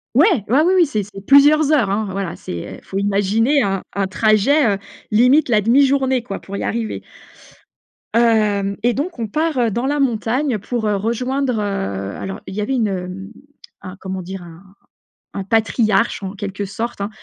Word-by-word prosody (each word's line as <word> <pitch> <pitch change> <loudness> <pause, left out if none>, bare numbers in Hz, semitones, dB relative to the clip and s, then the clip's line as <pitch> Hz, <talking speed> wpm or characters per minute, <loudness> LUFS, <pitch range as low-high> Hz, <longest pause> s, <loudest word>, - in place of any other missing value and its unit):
Ouais, 315 - +6 0.2
ouais, 265 +6 +4
oui, 370 +2 +3
oui, 345 -3 +5
c'est 215 -7 -2
c'est 195 0 -11
plusieurs 290 +2 +6
heures, 235 -10 +3
hein. 210 +1 0
Voilà 195 -3 -4
c'est, 85 -1 -7
heu, - - -14
faut 195 - -4
imaginer 205 +7 +2
un 195 -1 -1
un 195 -1 +1
trajet, 215 +5 +3
heu, - - -5 0.3
limite 250 +7 +4
la 215 -3 +3
1/2 245 +7 +4
journée 265 -2 +1
quoi, 200 -5 -6
pour 200 +1 -8
y - - -4
arriver 225 -1 -3 1.1
hem 210 -4 +2
et 240 0 +2
donc 300 +1 -4
on 225 - -2
part, 310 +4 -1
heu, 235 -2 +2
dans 240 +6 -2
la 290 +1 0
montagne 245 0 0
pour, 225 +2 -3
heu, 205 -1 +1
rejoindre, 250 +5 -1
heu, 195 - -3
alors, 195 0 -6
il - - -7
y 210 - -2
avait 265 +6 -1
une, 230 -4 +1
hem, 190 +2 -5 0.5
un, 185 +1 -8
comment 190 -1 -5
dire 190 +1 -7
un 170 +1 -13 0.8
un 195 - -2
patriarche 220 0 +1
en 190 +1 -5
quelque 200 0 -5
sorte, 210 +2 -5
hein, 200 - -2
215 Hz, 190 wpm, -19 LUFS, 195-255 Hz, 1.1 s, Ouais